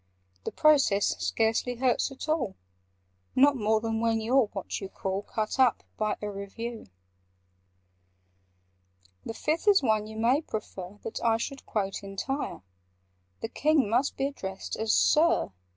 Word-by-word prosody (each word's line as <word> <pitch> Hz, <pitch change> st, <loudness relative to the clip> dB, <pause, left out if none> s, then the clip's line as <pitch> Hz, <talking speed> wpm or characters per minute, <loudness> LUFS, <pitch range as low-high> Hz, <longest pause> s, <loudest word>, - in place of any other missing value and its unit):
The -, -, -2 dB
process 275 Hz, -10 st, +4 dB
scarcely 225 Hz, +2 st, +1 dB
hurts 250 Hz, +2 st, +1 dB
at 270 Hz, -, -8 dB
all— 285 Hz, -11 st, 0 dB, 0.8 s
Not 280 Hz, +2 st, +6 dB
more 220 Hz, -2 st, +2 dB
than 225 Hz, 0 st, -2 dB
when 230 Hz, -1 st, +2 dB
you 225 Hz, +4 st, 0 dB
're 265 Hz, -5 st, +5 dB
what 200 Hz, -1 st, -5 dB
you 195 Hz, -, -5 dB
call 190 Hz, 0 st, -3 dB
'Cut 215 Hz, +4 st, -3 dB
up' 255 Hz, -3 st, +4 dB
by 215 Hz, -1 st, -1 dB
a 210 Hz, -, -2 dB
Review. 220 Hz, -, -6 dB, 2.4 s
"The 225 Hz, -, -6 dB
Fifth 315 Hz, -, -1 dB
is 400 Hz, -7 st, +6 dB
one 215 Hz, -3 st, +2 dB
you 220 Hz, 0 st, -9 dB
may 245 Hz, +6 st, +3 dB
prefer 205 Hz, -, -6 dB
That 225 Hz, -, -5 dB
I 225 Hz, -1 st, +3 dB
should 275 Hz, +4 st, -6 dB
quote 195 Hz, -3 st, -2 dB
entire:— 200 Hz, -, -4 dB, 0.8 s
The 225 Hz, -, -3 dB
King 300 Hz, -2 st, +2 dB
must 250 Hz, +4 st, +1 dB
be 270 Hz, -, 0 dB
addressed 190 Hz, -9 st, -5 dB
as 220 Hz, 0 st, 0 dB
'Sir. 320 Hz, -, +3 dB
225 Hz, 150 wpm, -28 LUFS, 210-270 Hz, 2.4 s, Not